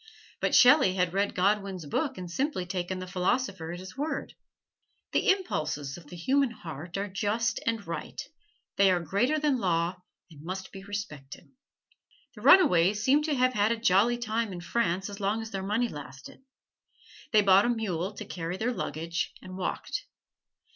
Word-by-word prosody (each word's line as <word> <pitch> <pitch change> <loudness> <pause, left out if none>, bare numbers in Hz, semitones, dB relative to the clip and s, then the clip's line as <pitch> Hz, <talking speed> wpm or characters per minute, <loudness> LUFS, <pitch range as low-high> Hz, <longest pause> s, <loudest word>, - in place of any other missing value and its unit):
But - - +1
Shelley 220 -6 +6
had 180 -2 +1
read 200 +1 0
Godwin's 195 -2 0
book 265 - -2
and 180 - -6
simply 265 - -1
taken 180 0 -3
the 185 - -5
philosopher 185 -1 -1
at 175 - -5
his 185 0 -10
word: 295 +4 -3 0.8
"The - - +2
impulses 155 - -1
of 170 -4 -13
the 180 - -10
human 265 +10 +2
heart 170 -5 -8
are 200 +1 -2
just 215 +3 -1
and 225 -3 -1
right; 165 - -6 0.6
they 195 -1 +6
are 180 -1 +3
greater 200 - +1
than 295 -4 +1
law, 175 -2 0 0.3
and 150 -3 -13
must 190 +3 -6
be 195 -1 -10
respected." 195 -9 -7 0.8
The - - -13
runaways 210 - +5
seemed 290 +3 +4
to 305 -2 0
have 255 0 +2
had 210 0 +2
a 230 - 0
jolly 225 +3 +3
time 225 -2 -2
in 175 -2 -6
France 190 -1 0
as 200 0 -8
long 205 +2 0
as 225 0 -6
their 195 - -3
money 210 +5 0
lasted. 140 - -10 0.9
They 215 -2 +5
bought 195 0 +6
a - - +2
mule 200 -6 -1
to - - -7
carry 170 +1 -4
their 240 +5 -1
luggage, 170 -4 -3
and 185 - -10
walked. 190 - -3
195 Hz, 175 wpm, -28 LUFS, 175-230 Hz, 0.9 s, Shelley